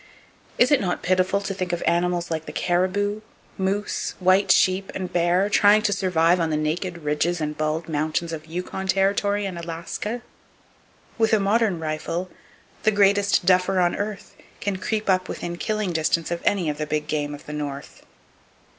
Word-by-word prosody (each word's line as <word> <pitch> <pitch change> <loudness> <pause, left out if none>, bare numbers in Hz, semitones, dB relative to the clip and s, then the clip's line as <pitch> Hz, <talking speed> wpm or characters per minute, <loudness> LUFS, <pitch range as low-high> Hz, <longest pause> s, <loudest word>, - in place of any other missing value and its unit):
Is 250 - +4
it 290 - +4
not 180 -3 -2
pitiful 185 +2 +2
to 195 - -3
think 185 -2 -3
of 175 - -2
animals 175 0 +1
like 160 -1 -3
the - - -5
caribou, 200 +4 0 0.3
moose, 195 +2 -2
white 185 +1 +3
sheep 185 +1 +3
and 185 -1 -4
bear 175 +3 +2
trying 210 +1 +5
to 205 -2 +2
survive 180 -3 +2
on 165 -1 0
the 155 - 0
naked 170 +3 -2
ridges 150 +4 0
and 150 -1 -3
bald 155 +2 -2
mountains 155 +2 -1
of 155 0 -7
Yukon 180 +3 -5
Territory 200 +1 +1
and 185 -3 -4
Alaska! 170 +8 -5 1.0
With 225 0 +3
a 220 - +5
modern 200 -2 +2
rifle, 165 +3 -3 0.5
the 215 - +3
greatest 200 -2 +3
duffer 185 +1 +3
on 175 -1 +2
earth 205 -1 -5 0.2
can 200 -1 -2
creep 215 +3 -2
up 185 -1 +2
within 175 0 -4
killing 215 0 -2
distance 160 +1 0
of 170 - -2
any 195 -5 +2
of 150 0 -2
the 155 - -2
big 150 0 -1
game 150 -1 -2
of 145 - -14
the 150 - -7
North. 145 -2 -6
180 Hz, 175 wpm, -24 LUFS, 165-200 Hz, 1.0 s, trying